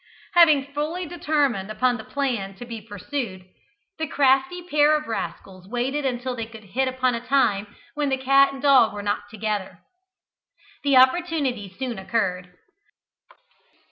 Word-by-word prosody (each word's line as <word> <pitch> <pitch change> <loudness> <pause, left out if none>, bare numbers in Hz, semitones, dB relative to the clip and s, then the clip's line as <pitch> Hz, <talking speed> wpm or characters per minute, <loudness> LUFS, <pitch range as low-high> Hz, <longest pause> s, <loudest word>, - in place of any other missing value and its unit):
Having 300 -6 +5
fully 315 +5 -2
determined 295 - 0
upon 245 +3 +1
the 220 - -8
plan 235 -10 -3
to 245 - -9
be 230 -2 -7
pursued, 205 -1 -5 0.5
the 315 - -1
crafty 275 +5 +2
pair 300 -1 +4
of 300 - -6
rascals 195 -4 -6
waited 260 +5 -1
until 250 0 -3
they 230 -2 -5
could 225 -1 -12
hit 255 +7 -1
upon 255 -1 0
a 235 - -3
time 240 -6 +1 0.3
when 295 -2 -1
the 265 - +1
cat 275 +1 +4
and 275 0 -9
dog 265 -6 +5
were 205 - -5
not 205 0 -2
together. 210 -4 -3 1.1
The 280 -2 +4
opportunity 260 - +2
soon 250 -5 -4
occurred. 180 -3 -2
255 Hz, 145 wpm, -24 LUFS, 215-285 Hz, 1.1 s, Having